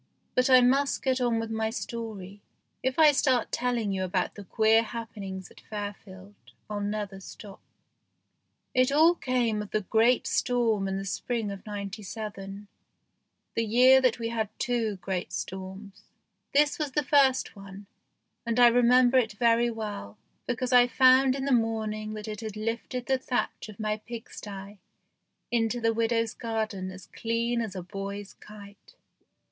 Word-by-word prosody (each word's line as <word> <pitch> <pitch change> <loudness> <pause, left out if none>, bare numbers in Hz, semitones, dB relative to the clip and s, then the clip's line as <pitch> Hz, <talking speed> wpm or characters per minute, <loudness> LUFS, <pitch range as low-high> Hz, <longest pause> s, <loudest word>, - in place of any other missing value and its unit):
But 255 +1 +2
I 255 -1 +8
must 270 +3 +2
get 260 -1 +1
on 240 -2 +2
with 225 0 -4
my 220 0 -1
story; 215 -4 -6 0.4
if 260 0 -1
I 310 -2 +7
start 260 -4 +1
telling 240 -4 -1
you 190 -1 -1
about 185 0 -1
the 205 - -10
queer 220 +3 +4
happenings 210 -5 -7
at - - -16
Fairfield 205 -2 -8 0.3
I'll 210 -1 -4
never 205 -1 -3
stop. 195 +1 -11 1.1
It 255 +1 +3
all 320 +4 +6
came 245 -8 0
of 210 - -7
the 215 - 0
great 225 +5 +3
storm 230 -5 +1
in 195 0 -2
the 195 - -4
spring 215 +3 -2
of 195 -1 -8
'97, 200 0 -6 0.9
the 230 - 0
year 250 +4 +6
that 255 -3 +2
we 230 -1 -3
had 220 -3 -2
two 230 -4 -1
great 185 -2 -3
storms. 190 +2 -7 0.5
This 290 +2 +3
was 295 -3 -2
the 300 - +1
first 270 -3 +3
one, 195 0 -11 0.6
and 235 0 -1
I 240 -1 +8
remember 245 +1 +5
it 220 -4 -1
very 235 +2 +3
well, 205 - -6 0.3
because 250 +1 -1
I 245 0 +7
found 260 +1 +5
in 270 -1 -3
the 280 - 0
morning 215 -2 0
that 215 0 -7
it 215 0 -5
had 215 -2 -6
lifted 230 +3 -3
the 265 -1 +1
thatch 250 -3 -3
of 215 - -12
my 215 0 -1
pigsty 205 -3 -9 0.7
into 235 0 +1
the 230 -1 +1
widow's 230 0 0
garden 220 -5 -3
as 185 0 -10
clean 235 +1 -1
as 215 -4 -5
a 185 - -5
boy's 195 +2 -6
kite. 205 -1 -14
225 Hz, 160 wpm, -28 LUFS, 205-245 Hz, 1.1 s, I